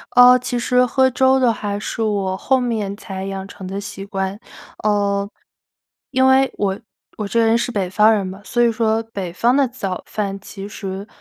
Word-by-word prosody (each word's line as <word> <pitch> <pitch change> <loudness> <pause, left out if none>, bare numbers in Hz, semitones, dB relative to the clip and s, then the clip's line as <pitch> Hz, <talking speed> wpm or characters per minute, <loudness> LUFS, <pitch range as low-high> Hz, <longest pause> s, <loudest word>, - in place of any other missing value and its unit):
呃， 245 +1 +9
其 250 0 -3
实 250 +1 +3
喝 260 +1 +3
粥 260 +1 +3
的 250 -3 +4
话 205 -2 -3
是 225 +2 -3
我 195 -3 -1
后 265 +5 +2
面 220 -5 -2
才 195 -2 -7
养 195 0 -5
成 195 -1 -10
的 195 +2 -4
习 195 -1 -7
惯。 195 0 -3 0.4
呃， 200 -1 +1 0.8
因 260 -1 +3
为 265 0 +4
我 195 -1 -1 0.4
我 210 - -3
这 230 - 0
个 225 - +4
人 225 +1 +4
是 235 +1 -2
北 195 -5 -1
方 215 +3 +5
人 205 -3 0
嘛， 185 +1 -7
所 240 - 0
以 235 -1 +4
说 225 0 +1
北 185 -5 -5
方 240 +8 +2
的 280 -2 +3
早 200 -7 -5
饭 200 -2 -3
其 195 0 -9
实 195 -1 -6
210 Hz, 215 characters per minute, -20 LUFS, 195-245 Hz, 0.8 s, 呃